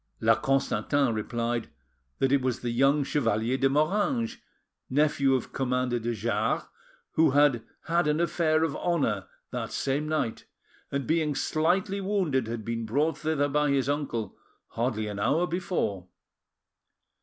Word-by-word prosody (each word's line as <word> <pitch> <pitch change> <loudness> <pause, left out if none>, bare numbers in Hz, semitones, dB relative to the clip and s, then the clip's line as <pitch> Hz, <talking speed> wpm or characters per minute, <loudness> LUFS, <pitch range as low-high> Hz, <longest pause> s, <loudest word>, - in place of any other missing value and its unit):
La 115 +1 +5
Constantin 135 +1 +1
replied 115 +1 -2 0.5
that 135 - +1
it' 140 -1 +4
was 130 -2 -1
the 120 - -2
young 135 +4 +3
Chevalier 115 -4 0
de 135 0 +2
Moranges, 210 - +1 0.5
nephew 140 -1 +3
of 130 - -4
Commander 125 -2 0
de 120 +1 -2
Jars, 115 +3 0 0.5
who 160 - +4
had 145 -5 +4 0.2
had 170 -1 +1
an 150 +1 +1
affair 160 -2 +2
of 160 -3 -1
honour 135 - 0 0.2
that - - -4
same 140 +3 -1
night, 155 -8 -2 0.5
and 140 -1 -2
being 155 -1 +1
sightly 185 +7 0
wounded 180 - 0
had 115 -2 -5
been 115 0 -2
brought 145 +7 0
thither 155 -2 +1
by 150 +1 +1
his 135 -2 +1
uncle 140 -8 -2 0.3
hardly 115 -2 -1
an 105 -1 -5
hour 145 +11 +2
before. 170 - -2
140 Hz, 145 wpm, -27 LUFS, 120-155 Hz, 0.5 s, La